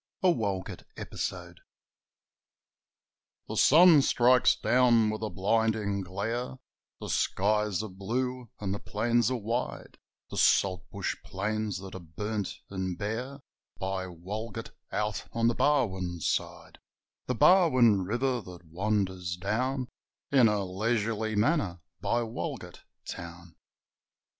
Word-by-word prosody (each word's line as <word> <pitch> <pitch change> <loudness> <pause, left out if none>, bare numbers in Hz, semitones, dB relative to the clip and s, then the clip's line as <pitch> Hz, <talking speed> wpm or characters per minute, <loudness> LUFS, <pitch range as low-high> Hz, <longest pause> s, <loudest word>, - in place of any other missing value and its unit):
A 185 - +6
Walgett 100 - -3 0.2
Episode - - -5 1.9
The - - -5
sun 165 0 +7
strikes 125 -1 +4
down 120 -3 +3
with 110 - -5
a 110 - -2
blinding 105 0 0
glare, 110 +8 -3 0.4
The - - -6
skies 105 -1 +1
are - - -4
blue 120 +6 -3
and 95 -2 -2
the 100 - -4
plains 120 +2 +1
are 130 - -1
wide, 115 +3 -4 0.3
The - - -5
saltbush 95 -2 +1
plains 105 +1 -2
that 95 -1 -9
are 95 - -6
burnt 100 +5 -4
and 95 -2 -3
bare 125 +8 -4 0.4
By 95 0 -3
Walgett 95 +6 -6 0.2
out 105 0 -2
on 115 0 +2
the 120 - +3
Barwon 95 -12 +1
side - - -3 0.5
The 125 - 0
Barwon 130 - +5
river 120 +5 0
that 90 -3 -12
wanders 95 0 -1
down 125 +7 -1 0.4
In 130 -4 +6
a 105 -2 0
leisurely 110 +2 -1
manner 105 - +1 0.2
by 120 0 0
Walgett 115 0 -6 0.3
Town. 85 -1 -8
105 Hz, 120 wpm, -29 LUFS, 95-120 Hz, 1.9 s, sun